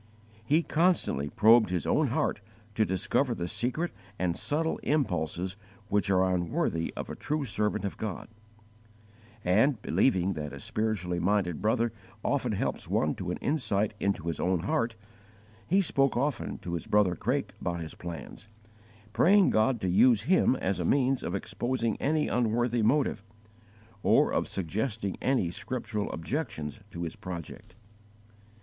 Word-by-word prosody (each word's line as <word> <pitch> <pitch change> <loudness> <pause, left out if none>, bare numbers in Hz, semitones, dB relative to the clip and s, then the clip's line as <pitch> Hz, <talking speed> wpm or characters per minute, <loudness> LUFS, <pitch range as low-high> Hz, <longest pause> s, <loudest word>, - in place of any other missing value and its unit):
He 150 +9 +3
constantly 160 - +1
probed 110 +3 +5
his 90 -2 -1
own - - +2
heart - - 0 0.3
to 110 +1 +2
discover 120 +7 0
the 85 -3 -3
secret 130 - -1 0.3
and 90 -2 0
subtle 160 +2 -1
impulses 95 - -1 0.3
which 105 0 +1
are 95 -1 +3
unworthy 85 -1 -1
of - - -4
a - - -6
true 150 -1 -2
servant 105 -3 -1
of 100 - -4
God; 105 -5 -4 1.2
and, 110 +8 +3
believing 95 -6 +2
that 75 -3 -5
a 70 - -7
spiritually 95 -2 -1
minded 90 -3 +1
brother 115 +1 +1 0.3
often - - 0
helps - - -2
one 75 - +1
to 90 -2 -5
an 90 - -2
insight 110 -9 0
into 100 -4 0
his 85 -3 -2
own 90 -2 +1
heart, 115 +5 0 0.7
he 195 +3 +3
spoke 135 -6 +2
often 140 +3 -1
to 85 - -4
his 85 - -4
brother 105 -4 +3
Craik - - -1
about 85 -1 -2
his 80 - -6
plans, 85 +4 -8 0.7
praying 195 - +5
God 110 +3 +2
to 95 - -1
use 110 +4 +5
him 180 -6 +3
as 95 -6 -1
a - - 0
means 135 +6 +2
of 90 - -3
exposing 115 +3 -1
any 155 +1 +1
unworthy 120 0 +1
motive, 115 -1 +2 0.8
or - - +4
of - - 0
suggesting 100 +3 -2
any 125 -11 +1
scriptural 110 0 -3
objections 80 - -4
to 85 -3 -6
his 80 - -5
project. 90 0 -8
105 Hz, 150 wpm, -29 LUFS, 90-125 Hz, 1.2 s, probed